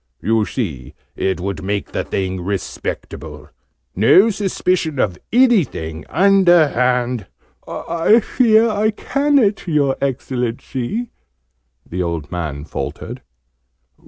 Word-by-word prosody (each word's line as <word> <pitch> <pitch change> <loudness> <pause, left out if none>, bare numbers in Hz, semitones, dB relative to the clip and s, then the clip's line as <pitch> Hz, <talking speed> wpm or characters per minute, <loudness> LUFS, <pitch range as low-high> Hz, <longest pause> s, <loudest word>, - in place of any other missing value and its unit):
You 110 0 +1
see 80 - -5 0.2
it 95 -1 -1
would 95 -3 -4
make 100 +1 -3
the - - -2
thing 95 -1 -3
respectable 95 -1 -5 0.4
no 185 - +5
suspicion 185 -6 -1
of 90 -8 0
anything, 180 - +2
underhand 130 - +3 0.3
" - - -43
"I 170 +7 +2
fear 230 -1 +3
I 215 0 +1
ca'n't, 265 -3 +1
your 145 -4 +2
Excellency!" 130 - -3 0.8
the 90 +2 -3
old 85 -4 -3
man 75 -5 -4
faltered. - - -6
130 Hz, 100 wpm, -19 LUFS, -, 0.8 s, no